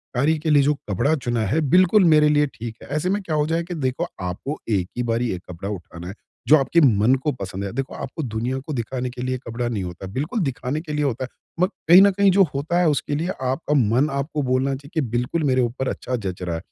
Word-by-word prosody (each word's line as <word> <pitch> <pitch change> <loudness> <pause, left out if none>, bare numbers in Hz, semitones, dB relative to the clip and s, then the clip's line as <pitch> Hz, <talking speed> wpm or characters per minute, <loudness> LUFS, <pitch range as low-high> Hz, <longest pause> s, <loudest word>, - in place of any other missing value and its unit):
कार्य 150 +6 +2
के 155 +1 -2
लिए 145 -2 +5
जो 150 +2 +3 0.2
कपड़ा 120 - +1
चुना 120 -5 -2
है 155 +10 +1
बिल्कुल 185 +3 +5
मेरे 155 -2 +5
लिए 150 0 +3
ठीक 115 -1 -6
है। - - -11
ऐसे 170 +4 0
में 205 +1 0
क्या 160 -5 -3
हो 150 0 +2
जाए 165 +1 0
कि 175 +1 -6
देखो 130 -4 -1
आपको 90 - -4
एक 95 -4 +1
ही 125 - 0
बारी 115 0 0
एक 90 - -6
कपड़ा 90 +3 -6
उठाना 85 -3 -7
है। 95 - -6 0.3
जो 155 - +8
आपके 140 +3 +3
मन 115 -2 +4
को 150 - +1
पसंद 100 -5 -6
है। 100 - -4
देखो 135 +1 -3
आपको 150 +4 -5
दुनिया 120 +2 -2
को 155 - -3
दिखाने 125 +1 -3
के 125 0 -8
लिए 130 0 -1
कपड़ा 120 +1 -2
नहीं 110 -5 -2
होता। 90 +2 -7
बिल्कुल 150 - -2
दिखाने 135 +2 -2
के 155 -3 -6
लिए 150 - 0
होता 130 -1 -1
है। - - -12 0.3
म - - +6 0.2
कहीं 180 +3 +10
न 200 0 +6
कहीं 200 0 +3
जो 195 +1 +5
होता 150 +5 0
है 180 - +3
उसके 145 0 -1
लिए 160 +4 -1
आपका 135 +4 -1
मन 130 +3 +3
आपको 140 +2 -2
बोलना 130 +2 +1
चाहिए 140 +1 -12
कि 160 - +1
बिल्कुल 125 +7 -1
मेरे 130 -2 +2
ऊपर 125 +2 -2
अच्छा 130 - -3
जच 95 -6 -5
रहा 85 -2 -2
है। 80 - -5
130 Hz, 255 wpm, -22 LUFS, 115-155 Hz, 0.3 s, कहीं